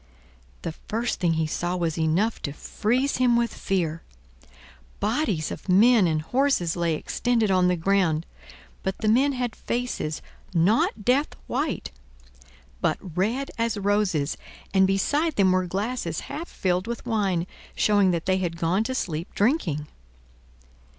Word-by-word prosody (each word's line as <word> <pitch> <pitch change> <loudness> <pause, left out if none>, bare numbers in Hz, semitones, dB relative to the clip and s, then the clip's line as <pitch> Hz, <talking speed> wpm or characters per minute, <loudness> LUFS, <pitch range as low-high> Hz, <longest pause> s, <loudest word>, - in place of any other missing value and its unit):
The 165 - -2
first 230 +8 -3
thing 175 -3 +2
he 160 0 +1
saw 175 +3 -2
was 170 -3 -1
enough 170 +8 +1
to 140 - -4
freeze 250 - 0
him 250 -2 +4
with 235 -1 +1
fear. 165 -5 -1 1.0
Bodies 210 - 0
of - - -8
men 210 +1 +6
and 155 -1 0
horses 245 - +1
lay 170 -2 0
extended 230 +5 0
on 185 -1 +4
the 180 - +3
ground; 170 -2 +1 0.6
but 190 0 -2
the 220 - -2
men 265 +6 +4
had 245 -2 -2
faces, 240 -11 -3 0.3
not 205 +4 +2
death 270 +5 +2
white, - - -2 0.9
but - - +1 0.2
red 230 +9 0
as 230 -2 0
roses, 200 -7 +1 0.4
and 190 -1 +5
beside 290 - +1
them 190 -2 +4
were 185 0 +1
glasses 195 -3 -2
half 330 +3 -6
filled 185 +2 -1
with 235 0 -5
wine, 200 -7 0 0.3
showing 205 -2 +3
that 170 -2 -1
they 190 0 +2
had 170 -2 -2
gone 175 +5 +1
to 260 - -2
sleep 165 -7 -3
drinking. 200 - +1
195 Hz, 145 wpm, -25 LUFS, 170-235 Hz, 1.0 s, men